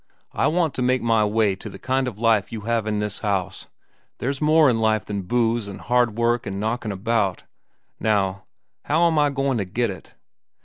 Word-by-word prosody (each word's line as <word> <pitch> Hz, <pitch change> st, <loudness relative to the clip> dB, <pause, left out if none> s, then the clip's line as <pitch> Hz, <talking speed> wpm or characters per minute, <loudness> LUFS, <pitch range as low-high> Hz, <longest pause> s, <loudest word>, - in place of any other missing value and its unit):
I -, -, +1 dB
want 165 Hz, -3 st, +1 dB
to -, -, -3 dB
make 125 Hz, 0 st, +1 dB
my 115 Hz, -2 st, +3 dB
way 105 Hz, -2 st, +1 dB
to 95 Hz, -, -9 dB
the -, -, -10 dB
kind 130 Hz, 0 st, -1 dB
of 115 Hz, -5 st, -5 dB
life 110 Hz, -3 st, +2 dB
you 110 Hz, -, -5 dB
have 115 Hz, 0 st, -1 dB
in 105 Hz, -1 st, 0 dB
this 105 Hz, -1 st, -2 dB
house. 100 Hz, -3 st, -2 dB, 0.5 s
There's 135 Hz, +3 st, -3 dB
more 155 Hz, 0 st, +5 dB
in 120 Hz, -3 st, +2 dB
life 110 Hz, -2 st, +1 dB
than 100 Hz, -1 st, -3 dB
booze, 115 Hz, +2 st, 0 dB
an' 100 Hz, -, -7 dB
hard 120 Hz, -3 st, +1 dB
work, 120 Hz, -1 st, +1 dB
an' 100 Hz, 0 st, -4 dB
knockin' 110 Hz, +1 st, -2 dB
about. 100 Hz, -1 st, -1 dB, 0.6 s
Now, 100 Hz, -2 st, 0 dB, 0.4 s
how 165 Hz, +3 st, +3 dB
am 160 Hz, -2 st, +3 dB
I 145 Hz, -1 st, +4 dB
goin' 135 Hz, -3 st, 0 dB
to 100 Hz, -, -1 dB
get 115 Hz, +4 st, -1 dB
it? 95 Hz, -, -12 dB
115 Hz, 205 wpm, -23 LUFS, 105-125 Hz, 0.6 s, more